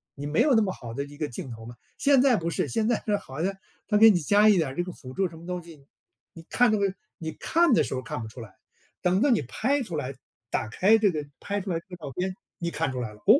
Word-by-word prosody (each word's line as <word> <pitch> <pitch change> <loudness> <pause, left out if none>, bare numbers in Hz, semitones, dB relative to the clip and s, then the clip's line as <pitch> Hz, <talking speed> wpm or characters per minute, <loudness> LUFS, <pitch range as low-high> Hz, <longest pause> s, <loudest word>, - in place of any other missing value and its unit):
你 145 - -6
没 155 +10 +2
有 280 +2 +4
那 220 - +5
么 190 -3 0
好 115 -8 -8
的 140 +4 -3
一 145 0 -13
个 150 -1 -2
镜 125 - -7
头 110 -1 -9
嘛。 120 +1 -9 0.2
现 275 -2 +5
在 260 -2 +5
不 170 -4 -1
是， - - -1
现 225 -1 0
在 240 - +1
是 210 - +2
好 135 -2 -7
像 195 +2 0 0.3
它 210 - +3
给 225 +1 +9
你 190 -5 +4
加 205 +7 +5
一 205 - +5
点 160 -5 +1
儿 130 - -8
这 175 - 0
个 180 - -6
辅 130 -6 -11
助 190 +5 0
什 165 - -12
么 165 - -12
东 180 -1 -4
西， 160 -5 -14 0.5
你 165 - -11
看 245 -2 +4
这 - - +3
个 200 -2 +1 0.3
你 160 -2 -4
看 335 -3 +2
的 - - +4
时 - - -4
候 130 - -2
儿 - - -17
看 125 - -5
不 110 - -6
出 115 +3 -10
来， 105 -4 -11 0.5
等 185 +2 +2
到 285 - +4
你 235 - +3
拍 270 - 0
出 180 -8 -6
来 140 -3 -3 0.4
打 - - 0
开 190 - +4
这 210 -2 +3
个 150 -3 -3
拍 205 0 -3
出 195 - -6
来 165 - 0
的 - - -20
照 155 -5 -7
片， 185 +1 -2 0.2
你 170 - -2
看 160 -3 -1
出 130 - -4
来 115 -4 -4
了， 105 - -18
哦， 225 +7 +8
175 Hz, 325 characters per minute, -26 LUFS, 140-215 Hz, 0.5 s, 给